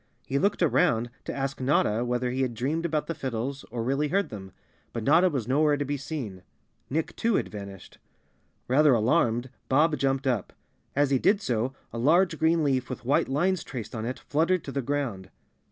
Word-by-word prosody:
He 140 +1 0
looked 200 +1 +1
around 120 -6 +2
to - - -3
ask 135 0 -3
Notta 120 -4 +2
whether 125 0 -1
he 130 +1 -1
had 125 -3 -1
dreamed 155 +8 -1
about 155 -2 -1
the 165 - -3
fiddles 135 -1 -4
or 115 0 -3
really 135 +5 0
heard 195 +6 0
them, 95 -4 -8 0.4
but 115 - -3
Notta 165 +8 +5
was 130 -8 -3
nowhere 145 +3 +3
to 145 - -2
be 145 +1 -2
seen. 135 - -5 0.5
Nick, 160 +3 -2
too, 230 -2 +1
had - - 0
vanished. 100 -3 -9 0.7
Rather 140 +1 +5
alarmed, 120 +2 +1 0.2
Bob 150 +4 +4
jumped 135 0 0
up. 120 -7 -1 0.4
As 140 0 +2
he 135 - +3
did 205 - +3
so 125 - -1 0.2
a 115 - -4
large 165 +5 +3
green 160 0 +3
leaf 130 -3 0
with 125 -2 -6
white 135 +1 +2
lines 175 +5 +1
traced 120 -6 -7
on 110 - -4
it 125 +2 -3
fluttered 165 +4 0
to 140 - -6
the 140 - -1
ground. 125 -9 -3
135 Hz, 195 wpm, -27 LUFS, 120-150 Hz, 0.7 s, Notta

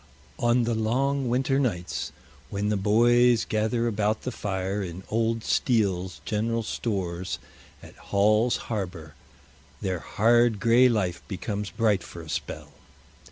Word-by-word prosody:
On 120 +1 +3
the 115 0 0
long 130 +4 0
winter 135 +2 +1
nights, 90 -10 -2 0.4
when 100 +1 -1
the 105 - +1
"boys" 120 +4 +4
gather 110 +2 0
about 110 -1 0
the 130 - -3
fire 100 -2 -2
in 90 0 -6
Old 115 0 0
Steele's 95 -6 0
General 115 +2 -1
Stores 95 -6 -3 0.5
at - - -13
Hall's 105 +4 +3
Harbor, 90 -7 -4 0.7
their 95 -2 -2
hard 115 +2 +3
gray 120 +4 +5
life 95 -7 -1
becomes 100 +1 -4
bright 110 -5 +1
for 85 0 -10
a 80 - -12
spell. - - -5
110 Hz, 130 wpm, -26 LUFS, 95-120 Hz, 0.7 s, gray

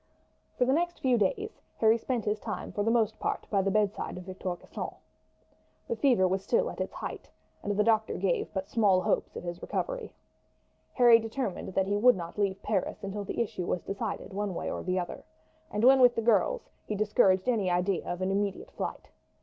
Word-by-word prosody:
For 250 - +3
the 260 - +2
next 345 +3 0
few 255 -2 +3
days 325 - -1 0.2
Harry 225 +1 +4
spent 240 -2 -2
his 210 0 0
time - - -5
for 205 - -2
the 225 - +1
most 225 -2 +1
part - - -2
by 200 -2 +3
the 195 - 0
bedside 205 -2 0
of 180 - -7
Victor 185 -1 -4
de - - -18
Gisons. - - -6 0.9
The 470 - -1
fever 245 - +3
was 190 +1 -1
still 485 - +1
at - - -6
its - - -3
height, - - -7 0.3
and 205 0 -2
the 210 - +4
doctor 220 0 +2
gave 185 -2 0
but 190 -2 -3
small 200 -5 +3
hopes - - -1
of - - -6
his 175 0 -5
recovery. - - -3 0.8
Harry 240 -3 +7
determined 225 -5 -4
that 190 - +3
he 200 +1 0
would 245 +3 +6
not 170 +2 -7
leave 195 -1 0
Paris 195 -2 -1
until 200 +1 -4
the 200 - -5
issue 185 -5 -5
was 175 - -1
decided 200 0 -4
one 200 -2 -2
way - - -3
or - - -4
the 185 0 -1
other, 175 -1 -4 0.5
and 210 - -2
when 265 +2 +7
with 245 -1 +6
the - - 0
girls 240 - +2
he 210 - -4
discouraged 195 -2 +3
any 215 -7 +2
idea 180 +1 +1
of 175 +1 -3
an 190 - 0
immediate 200 0 -2
flight. - - -5
205 Hz, 210 wpm, -29 LUFS, 190-235 Hz, 0.9 s, Harry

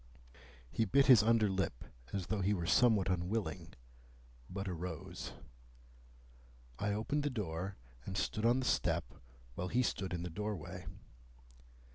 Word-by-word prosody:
He 115 - +1
bit 135 +7 +4
his 125 -6 +9
under 110 0 +4
lip 95 -10 -1 0.3
as 95 -3 -2
though 105 +1 -1
he 100 +3 +2
were 85 -3 -2
somewhat 105 +1 +4
unwilling, 90 -1 -2 0.8
but 100 +1 -4
arose. 90 -2 -5 1.5
I 100 +1 0
opened 115 +9 0
the 145 - 0
door, 95 - -3 0.3
and 95 0 -4
stood 105 +2 -1
on 120 +3 +4
the - - -3
step, 60 - +1 0.4
while 90 +8 -3
he 125 +7 +2
stood 95 -5 -1
in 85 -1 -2
the 90 - -4
doorway. 105 -2 -5
100 Hz, 140 wpm, -35 LUFS, 90-110 Hz, 1.5 s, his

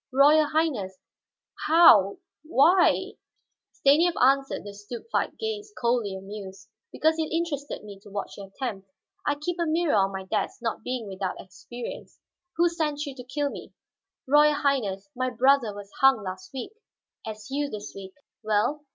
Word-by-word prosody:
"Royal 295 +3 +5
Highness, 275 - -1 0.7
how 235 - +7 0.2
why 330 +4 +3 0.3
" - - -57
Stanief 320 +5 +4
answered 270 +2 +2
the 205 0 -8
stupefied 220 - -4
gaze, 430 -2 -4
coldly 235 -5 0
amused. 195 0 -9 0.2
"Because 315 +1 +1
it 315 - -2
interested 315 -6 -3
me 200 -2 -10
to 205 +1 -15
watch 200 0 -5
your 200 -1 -9
attempt. 195 -3 -6 0.4
I 290 - +2
keep 340 +4 -4
a 340 - +1
mirror 325 0 +1
on 195 -1 +3
my 190 0 -5
desk, - - -2
not 230 -2 -3
being 250 -2 -4
without 190 -1 -4
experience. 240 +6 -9 0.4
Who 345 +1 +4
sent 310 -3 -2
you 280 - -6
to 255 -1 -10
kill 285 +3 -2
me?" - - -10 0.5
"Royal 295 +2 +5
Highness, 255 -10 0
my 255 +1 -1
brother 255 -1 +3
was 205 0 -10
hung 270 -5 +5
last 185 -1 -7
week." 270 - -6 0.5
"As 215 +2 -8
you 285 +1 -1
this 210 -2 -7
week. 190 -1 -10 0.3
Well?" 220 +7 0
255 Hz, 160 wpm, -26 LUFS, 205-300 Hz, 0.7 s, how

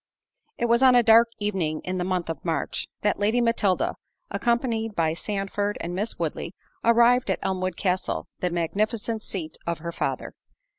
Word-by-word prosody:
It 240 - 0
was 235 +1 +3
on 260 -1 +7
a 245 - +6
dark 230 +1 +7
evening 185 -7 -1
in 185 0 -3
the - - 0
month 180 -1 -1
of 165 -3 -5
March, 165 -2 -1 0.2
that 205 -1 +1
Lady 215 +4 +2
Matilda, 230 -5 +1 0.3
accompanied 235 -3 0
by 160 -1 +1
Sandford 205 +2 -2
and 170 +1 -4
Miss 205 +5 -2
Woodley, 165 +2 -3 0.3
arrived 235 +1 +5
at 190 - +2
Elmwood 185 -2 -1
Castle, 185 -1 -1
the 180 - 0
magnificent 215 +6 -1
seat 165 -7 -5
of 170 -1 0
her 170 +1 -5
father. - - -3
200 Hz, 165 wpm, -25 LUFS, 175-230 Hz, 0.3 s, on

